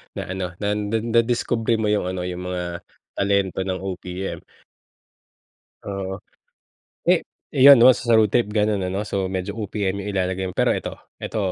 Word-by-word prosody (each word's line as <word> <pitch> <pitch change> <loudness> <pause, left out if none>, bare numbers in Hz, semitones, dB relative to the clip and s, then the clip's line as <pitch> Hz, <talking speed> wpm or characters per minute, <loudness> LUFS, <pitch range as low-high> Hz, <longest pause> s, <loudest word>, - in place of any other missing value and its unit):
Na - - -3
ano, 95 -2 -3
na 100 - 0
na 105 +2 -1
nadiskubre 115 0 +1
mo 110 -1 0
'yung 105 -3 +1
ano, 90 0 -3
'yung 90 0 -5
mga 90 -1 -4 0.3
talento 100 -2 +1
ng 95 -1 -2
OPM. 95 0 -5 1.4
Oo. 95 -1 -5 0.9
Eh, - - +3 0.2
eh, 130 - -2
'yon 140 - +12
'no 130 - +10
sound 115 -4 +3
trip 120 -3 +2
gano'n 105 -3 +1
ano, 95 +3 -2
so 100 -2 -2
medyo 95 +3 -4
OPM 100 -2 -2
'yung 100 +1 -4
ilalagay 95 0 -1
mo. 90 - -6
Pero - - +2
'eto, - - -2 0.3
'eto, 110 - -4
100 Hz, 160 wpm, -22 LUFS, 95-110 Hz, 1.4 s, yon